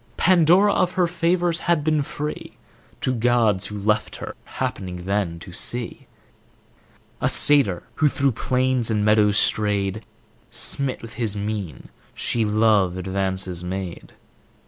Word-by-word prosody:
Pandora 185 +3 +4
of 180 -1 +1
her 185 -2 +2
favors 170 0 0
had 170 -4 +2
been 155 -1 +1
free 150 +2 -6 0.4
To 130 - 0
gods 115 -5 +2
who 105 - -7
left 105 +1 0
her; - - -7
happening 90 -2 -5
then 95 -4 -1
to 90 - -10
see 120 +6 -3 1.1
A - - +2
satyr 140 -12 +4
who 155 - +3
through 140 -1 +1
plains 125 0 0
and 105 -2 0
meadows 105 -1 +3
strayed, 105 0 +1 0.5
Smit 135 -4 -2
with 115 0 -9
his 105 -3 0
mien, 100 -7 -5 0.3
she 115 - 0
love 105 -4 +2
advances 95 -1 -2
made. 90 -1 -6
110 Hz, 130 wpm, -22 LUFS, 100-140 Hz, 1.1 s, Pandora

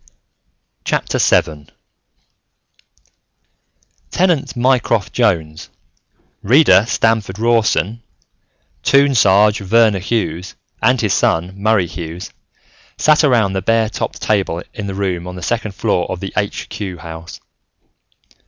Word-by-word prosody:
VII 75 -2 0 2.4
Tenant 175 - 0
Mycroft 120 -4 +1
Jones, 80 -10 -1 0.7
Reader 125 -2 +5
Stamford 110 -5 0
Rawson, 115 -2 +1 0.8
Toon 140 0 +3
Sarge 105 -1 +4
Verner 110 0 +3
Hughes, 95 -4 -3 0.3
and - - +3
his - - 0
son, 85 +3 0
Murray 100 -1 +1
Hughes, 85 0 -8 0.7
sat 155 +1 +3
around 115 -9 +2
the 95 - -2
bare 115 +2 +1
topped - - -5
table 95 -5 -1
in 105 -4 -6
the 95 - -5
room 90 -3 -3
on 90 - -7
the 90 - -8
second 110 -2 -2
floor - - -1
of - - -4
the - - -6
Aitch - - -3
Cue 95 -4 -6
House. 80 0 -10
100 Hz, 110 wpm, -17 LUFS, 90-115 Hz, 2.4 s, Reader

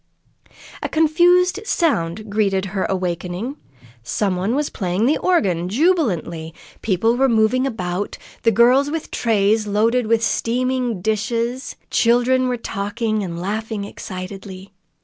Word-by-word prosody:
A - - -3
confused 350 +4 +3
sound 215 - 0
greeted 200 -2 0
her 195 - 0
awakening. 185 - -3 0.4
Some 190 - -1
one 195 +7 -1
was 295 0 -1
playing 185 +2 -1
the 290 +5 +2
organ 185 - +1
jubilantly; 195 - 0 0.3
people 225 +3 +1
were 265 +1 +3
moving 235 +3 +2
about 185 -5 -3 0.3
girls 250 +6 +4
with 320 +1 -4
trays 215 -1 +1
loaded 225 +4 +1
with 230 0 +2
steaming 245 -2 0
dishes; 230 +4 -1 0.2
children 245 +2 +3
were 250 -1 -1
talking 215 +1 -2
and 170 -3 -5
laughing 210 +2 -3
excitedly. 190 0 -8
220 Hz, 120 wpm, -20 LUFS, 190-255 Hz, 0.4 s, girls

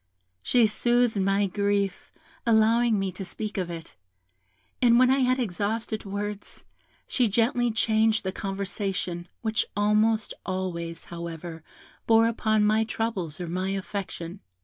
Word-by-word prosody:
She 235 - +4
soothed 240 0 +2
my 195 +1 +2
grief 200 0 -1 0.3
by 235 - +3
allowing 225 +1 +4
me 195 -1 -1
to 185 +2 -6
speak 210 +2 -5
of 180 -2 -2
it; 165 -1 -7 0.9
and 235 -2 +6
when 255 +1 +5
I 270 - +3
had 255 0 +3
exhausted 220 0 -2
words, 205 +1 -5 0.4
she 250 -3 +2
gently 240 +3 +2
changed 220 0 +2
the 190 - -2
conversation, 195 -3 -3 0.2
which 220 -1 +1
almost 215 +1 +2
always, 170 -3 -4
however, 170 -1 -7 0.4
bore 225 0 +6
upon 220 -2 +2
my 215 +1 +3
troubles 215 -8 -2
or 175 - -4
my 185 +3 -2
affection. 190 -2 -5
205 Hz, 135 wpm, -26 LUFS, 185-225 Hz, 0.9 s, and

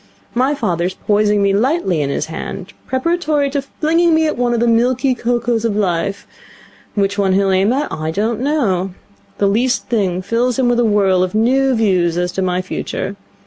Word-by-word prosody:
My 260 +4 +1
father 175 -10 -1
is 185 +1 -3
poising 210 -1 +1
me 200 0 +2
lightly 215 - +1
in 140 - -1
his - - -1
hand, 185 +4 -7
preparatory 300 0 0
to 280 0 -1
flinging 325 +4 +1
me 320 0 +2
at 305 - 0
one 245 0 0
of - - 0
the 235 - +2
milky 250 +3 +2
cocos 240 -1 -1
of 225 -3 0
Life. 195 0 -1 0.7
Which 200 0 0
one 190 -2 +2
he'll 195 0 +2
aim 190 +3 +2
at 280 +4 -1
I 155 0 -3
don't 215 +7 -1
know. 200 - 0 0.4
The 205 - +1
least 240 +6 +1
thing 190 -6 0
fills 240 +5 0
him 260 -2 +2
with 240 0 +2
a - - +3
whirl 195 -4 +3
of 185 +2 -1
new 260 +4 +2
views 180 -6 +1
as 180 0 -1
to 190 - -3
my 185 0 0
future. 190 +1 -4
215 Hz, 195 wpm, -17 LUFS, 190-255 Hz, 0.7 s, a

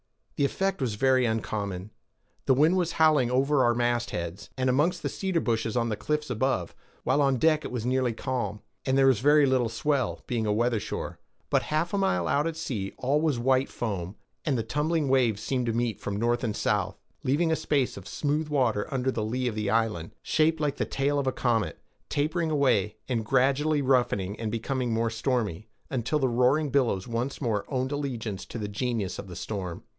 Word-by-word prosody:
The 140 - +2
effect 195 +4 -1
was 120 -5 -1
very 130 +1 +3
uncommon; 105 -3 -3 0.6
the 130 - +5
wind 155 +7 +4
was 175 -3 0
howling 155 -6 +4
over 135 +2 +3
our 120 -1 +3
mastheads, 120 -6 -2
and 130 0 +2
amongst 165 +8 +1
the - - 0
cedar 190 -3 -1
bushes 115 -3 -1
on 115 -1 +1
the 110 - -1
cliffs 150 +6 -2
above, 120 -7 0 0.3
while 145 - +2
on 135 -2 +3
deck 155 +3 +3
it - - -4
was 120 -2 -3
nearly 130 -1 +1
calm, 115 -4 -3 0.2
and 130 0 +1
there 135 - +5
was 130 -5 +4
very 145 +3 +5
little 130 -3 +2
swell, 130 +3 -1
being 115 -3 -1
a - - +2
weather 115 +1 +1
shore; - - -5 0.3
but - - +4
half 155 +4 0
a - - +2
mile 90 - +1
out 145 - +2
at 165 -1 -4
sea 105 -11 -3
all 140 +4 +1
was 155 -5 +1
white 130 +2 +2
foam, 100 -4 -4 0.3
and 140 -4 +1
the 115 - -1
tumbling 150 +6 0
waves 120 -6 +2
seemed 125 -3 -1
to 115 - +1
meet 115 -2 -1
from 100 - -4
north 120 +3 +1
and 110 -3 -1
south, - - 0 0.3
leaving 160 +5 +2
a - - +3
space 145 -4 0
of 100 -1 -9
smooth 150 +1 -1
water 125 -8 0
under 130 0 0
the 110 - -2
lee 125 +4 -1
of 120 - -1
the 105 -1 -2
island, 110 -7 0
shaped 160 0 +2
like 150 -2 -1
the - - 0
tail 140 +1 0
of 135 - -2
a - - +3
comet, 115 -4 0 0.3
tapering 160 +3 0
away, 130 -9 +2
and 120 -4 -1
gradually 140 +5 +2
roughening 120 -7 +1
and 110 -2 -2
becoming 125 +2 -2
more 115 0 +1
stormy, 110 - -1 0.2
until 130 +3 0
the 135 -3 +2
roaring 130 +5 +2
billows 120 -9 +1
once 120 +3 -2
more 110 -6 0
owned 130 -1 -1
allegiance 120 -9 -3
to - - -8
the 105 -2 -3
genius 105 -2 -2
of 100 - -7
the 90 - -8
storm. 90 -2 -5
125 Hz, 205 wpm, -27 LUFS, 110-145 Hz, 0.6 s, the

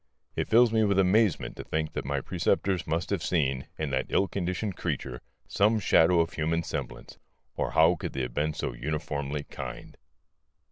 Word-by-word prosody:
It - - -1
fills 115 0 +5
me 110 -1 +4
with 100 -2 +2
amazement 95 0 +2
to - - -6
think 80 -1 -2
that - - -4
my 70 0 -1
preceptors 95 +3 0
must 85 +4 -1
have 100 -4 0
seen, 70 -7 0
in 75 -3 -2
that 65 -1 0
ill 95 - +2
conditioned 95 +1 -3
creature, 60 -2 -4 0.3
some 110 +2 +2
shadow 85 -3 +4
of 80 - -2
human 80 +1 0
semblance, - - -6 0.4
or - - -2
how 80 +2 +5
could - - -5
they 65 - -2
have 60 -1 -4
been 75 +3 -1
so - - -3
uniformly 70 +1 -3
kind? - - -8
80 Hz, 180 wpm, -28 LUFS, 70-95 Hz, 0.4 s, fills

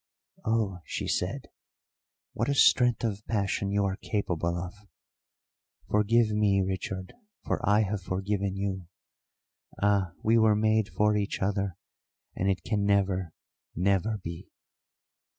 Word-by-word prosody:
"Oh," 110 -5 0
she - - -4
said, - - -2 0.9
"what 115 +5 -1
a 140 - +1
strength 125 -3 +4
of 105 -2 -2
passion 100 -2 0
you 100 0 +1
are 95 0 -1
capable 85 -6 -2
of! 90 +1 -5 1.2
Forgive 110 +2 +3
me, 105 -2 +3
Richard, 95 0 -4 0.3
for - - 0
I 105 +1 +5
have 100 -1 -1
forgiven 95 +1 -2
you. 95 -3 -3 0.9
Ah, 100 -4 +2
we 115 +1 +4
were 110 -1 +5
made 110 0 +2
for 105 -1 +2
each 105 -1 -1
other, 100 -2 -1 0.6
and 95 - 0
it 95 -2 -1
can 105 -3 0
never, 95 -3 +1 0.4
never 100 +4 +1
be." 85 -4 -8
100 Hz, 130 wpm, -28 LUFS, 95-105 Hz, 1.2 s, I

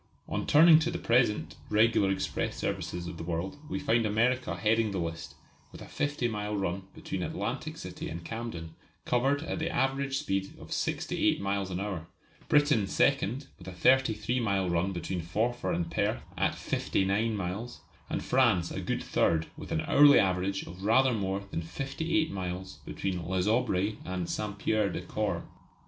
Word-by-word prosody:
On - - -3
turning 160 +1 +8
to 160 +1 0
the 170 - -3
present 105 - +1
regular 110 -2 +4
express 95 0 -1
services 90 0 -3
of 85 -1 -6
the 80 - -6
world 85 - -3
we - - -2
find 120 -6 +2
America 120 +4 +1
heading 110 0 +2
the 100 - -3
list 85 -1 -4 0.4
with - - -11
a - - -9
50 145 -4 -1
mile 105 -2 -3
run 95 0 -2
between - - -4
Atlantic - - -3
City - - -6
and 85 +1 -7
Camden, 115 -9 -5 0.3
covered 135 +4 +1
at 165 - -3
the 160 +1 -1
average 135 -2 0
speed 95 -5 -2
of - - -12
68 - - 0
miles 100 -1 -1
an 90 -1 -3
hour; 95 -5 -4 0.4
Britain 145 -9 +4
second 135 +4 +1
with - - -12
a - - -5
33 120 +3 +3
mile 100 -5 +1
run 85 +2 +1
between 90 0 -3
Forfar 110 +8 -1
and 170 -1 -1
Perth 105 +2 0
at - - +1
59 100 +4 0
miles; 100 +6 -4 0.3
and - - -2
France 115 -10 +3
a - - -4
good - - -2
third 80 -1 +1
with - - -9
an 80 - +1
hourly 145 0 +7
average 95 +1 +1
of 90 +3 -10
rather 125 +5 +4
more 95 -2 -1
than 85 - -2
58 160 - -1
miles 95 -1 -5
between 90 -3 -3
Les 95 0 0
Aubrais 105 -2 +1
and 90 0 -3
S. 85 - -3 0.2
Pierre 105 0 +1
des - - -4
Corps. - - -2
105 Hz, 170 wpm, -29 LUFS, 95-125 Hz, 0.4 s, turning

